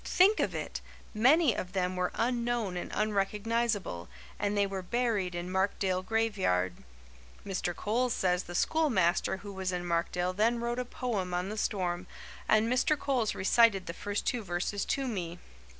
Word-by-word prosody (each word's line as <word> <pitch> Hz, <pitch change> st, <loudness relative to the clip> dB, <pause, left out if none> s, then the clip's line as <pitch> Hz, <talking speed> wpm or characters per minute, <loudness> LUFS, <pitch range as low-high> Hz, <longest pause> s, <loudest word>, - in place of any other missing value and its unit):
Think 395 Hz, +4 st, +4 dB
of -, -, 0 dB
it! -, -, -4 dB, 0.3 s
Many 260 Hz, +4 st, +5 dB
of 180 Hz, 0 st, -5 dB
them 185 Hz, -1 st, 0 dB
were 180 Hz, 0 st, 0 dB
unknown 235 Hz, -4 st, 0 dB
and 175 Hz, -, -4 dB
unrecognizable, 210 Hz, -, -1 dB, 0.3 s
and 205 Hz, 0 st, 0 dB
they 200 Hz, -, +4 dB
were 195 Hz, -1 st, -4 dB
buried 205 Hz, -3 st, 0 dB
in 175 Hz, +1 st, -4 dB
Markdale 190 Hz, -1 st, 0 dB
graveyard. 190 Hz, -, +1 dB, 0.7 s
Mr. 185 Hz, -3 st, -2 dB
Coles 240 Hz, +6 st, 0 dB
says 180 Hz, -3 st, +1 dB
the 175 Hz, -, -7 dB
schoolmaster 190 Hz, -, +2 dB
who 200 Hz, -, -6 dB
was 190 Hz, -1 st, -2 dB
in 180 Hz, -1 st, -3 dB
Markdale 175 Hz, +1 st, 0 dB
then 225 Hz, +5 st, +2 dB
wrote 235 Hz, +1 st, -2 dB
a 250 Hz, -, -2 dB
poem 205 Hz, -8 st, -2 dB
on 180 Hz, +2 st, -1 dB
the 215 Hz, -, -4 dB
storm 180 Hz, -3 st, -1 dB, 0.4 s
and 215 Hz, +1 st, +4 dB
Mr. 255 Hz, +5 st, +2 dB
Coles 255 Hz, -7 st, 0 dB
recited 200 Hz, -1 st, +4 dB
the 170 Hz, -, -5 dB
first 205 Hz, +3 st, -3 dB
two 245 Hz, -, 0 dB
verses 185 Hz, +2 st, -2 dB
to 275 Hz, -1 st, -1 dB
me. 175 Hz, -7 st, -3 dB
200 Hz, 165 wpm, -30 LUFS, 180-235 Hz, 0.7 s, Many